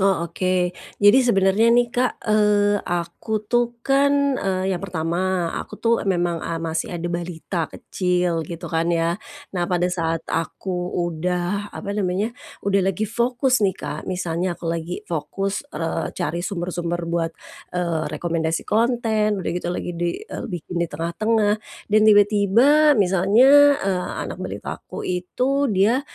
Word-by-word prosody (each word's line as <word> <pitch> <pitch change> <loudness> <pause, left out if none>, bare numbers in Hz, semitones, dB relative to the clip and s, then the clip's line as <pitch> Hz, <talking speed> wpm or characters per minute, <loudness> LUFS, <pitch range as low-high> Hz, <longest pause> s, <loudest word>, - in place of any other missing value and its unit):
Oh 190 -3 +2
oke. 180 +1 0 0.3
Jadi 205 +6 +8
sebenernya 210 -2 +3
nih 240 0 +3
Kak, 250 0 0
eee, 205 -1 +3
aku 175 +5 -3
tuh 240 +2 0
kan, 280 0 +3
eee, 190 0 0
yang 175 - -3
pertama, 175 0 -1
aku - - -9
tuh 230 0 +1
memang 175 -2 0
a 165 - -3
masih 165 +1 -3
ada 170 - -6
balita 170 -1 -3
kecil 180 -2 -1
gitu 170 -1 -7
kan 165 +1 +1
ya. 170 +2 0 0.3
Nah 175 -2 -1
pada 180 -1 +1
saat 165 -2 -1
aku 175 +3 -3 0.2
udah 180 +4 -1
apa 200 -1 -4
namanya, 205 +2 -1 0.3
udah 200 0 +3
lagi 195 +3 -1
fokus 245 +3 +1
nih 195 -3 +2
Kak. 150 +5 -6
Misalnya 175 -1 -2
aku - - -13
lagi 170 +5 -5
fokus, 195 +4 -3 0.2
eee, 165 -1 -2
cari 170 +2 -2
sumber-sumber 175 -2 -3
buat, 170 -1 -1 0.5
eee, 170 -4 -1
rekomendasi 165 0 -1
konten, 220 -3 +1
udah - - -1
gitu 175 0 -3
lagi 175 0 -3
di 175 - -3
eee, - - -6
bikin 175 -2 -4
di 170 - 0
tengah-tengah 210 +7 0 0.3
dan 215 - +6
tiba-tiba 215 +9 +5
misalnya, 225 +10 +6
eee, 190 -8 -1 0.2
anak - - -7
balita - - -5
aku - - -8
itu 255 +10 0
dia 210 +6 +3
185 Hz, 145 wpm, -22 LUFS, 170-215 Hz, 0.5 s, Jadi